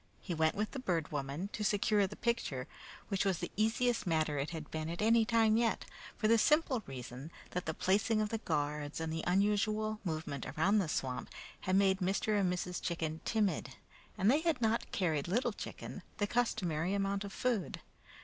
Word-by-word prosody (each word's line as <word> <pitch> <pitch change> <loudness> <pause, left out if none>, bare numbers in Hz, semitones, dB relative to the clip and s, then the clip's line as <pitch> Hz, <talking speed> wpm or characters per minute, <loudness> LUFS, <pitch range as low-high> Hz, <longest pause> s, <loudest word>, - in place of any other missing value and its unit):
He 180 - -4
went 160 -1 +2
with 210 +1 -1
the 270 - -5
Bird 170 - -1
Woman 145 +6 -3
to 210 - -4
secure 205 0 +3
the - - -9
picture, 230 - -1 0.4
which 195 -3 +1
was 195 -3 +1
the 175 - -5
easiest 225 +1 +1
matter 155 -3 +1
it 140 - -1
had 160 -3 -7
been 160 0 -3
at 170 - -5
any 225 +1 +4
time 225 -1 +4
yet, 230 -1 +1 0.3
for 215 - +1
the 230 +1 +5
simple 300 -3 +3
reason 130 +2 -7 0.2
that 180 -2 -3
the 160 - 0
placing 210 +3 +2
of 215 -1 0
the 225 - -2
guards 150 -4 -2
and 160 0 -2
the 160 - -3
unusual 210 +3 +2
movement 155 -6 -3
around 200 +7 +2
the 180 -6 0
swamp 130 -3 -2 0.3
had 185 - 0
made 195 -1 +4
Mr. 200 +3 +1
and 185 -2 +2
Mrs. 180 0 -3
Chicken 160 -2 -2
timid, 215 -4 0 0.4
and 200 +3 +4
they 295 +4 +3
had 330 -4 +1
not 225 0 0
carried 160 -6 0
Little 225 +9 +1
Chicken - - -7 0.2
the 205 - +1
customary 195 -7 0
amount 200 0 0
of 200 - -6
food. 235 -3 -1
195 Hz, 190 wpm, -34 LUFS, 160-215 Hz, 0.4 s, the